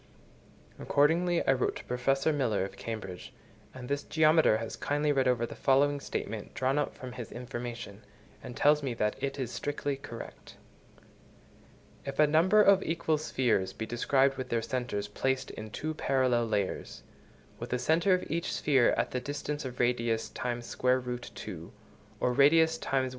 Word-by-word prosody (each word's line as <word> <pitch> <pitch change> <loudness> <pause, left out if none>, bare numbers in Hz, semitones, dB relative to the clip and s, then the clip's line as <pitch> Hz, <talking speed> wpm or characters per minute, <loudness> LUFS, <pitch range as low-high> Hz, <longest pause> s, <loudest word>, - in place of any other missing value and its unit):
Accordingly 170 +4 +2
I - - +6
wrote 125 - 0
to - - -8
Professor 135 +5 +1
Miller, 115 -9 0
of - - -9
Cambridge, 105 -6 -7 0.4
and 130 -1 -9
this 140 +1 -1
geometer 155 -7 +4
has 115 0 -5
kindly 145 +1 0
read 135 -2 +2
over 120 -2 +2
the - - -8
following 140 +1 +2
statement, 110 -5 -5
drawn 130 +4 +1
up 145 - -2
from 130 -1 -8
his 120 -2 -8
information, 120 -4 -7 0.4
and 125 - -9
tells 150 +1 +4
me 130 -4 -3
that 105 -1 0
it 135 0 -2
is 130 -4 -3
strictly 145 -1 -2
correct:— 125 -4 -10 1.5
If 135 0 -6
a 150 - +6
number 170 +8 +5
of 195 -1 +6
equal 160 -2 0
spheres 120 -10 0
be 110 - -5
described 135 +3 +2
with 130 - -5
their 115 -1 0
centres 120 -6 -3
placed 130 +5 -1
in 110 0 -8
two 155 +8 -4
parallel 130 -5 +1
layers; 105 -3 -3 0.6
with - - -6
the 125 - 0
centre 170 +8 +3
of 180 - -3
each 170 +3 -2
sphere 135 -5 +3
at - - 0
the 125 - -1
distance 145 +1 -4
of 125 -1 -7
radius 115 -2 0
x 120 -1 -4
sqrt(2) 125 -8 -2 0.5
or 125 - +1
radius 160 +5 +5
x - - -7
1. 130 -1 +2
130 Hz, 165 wpm, -30 LUFS, 120-145 Hz, 1.5 s, I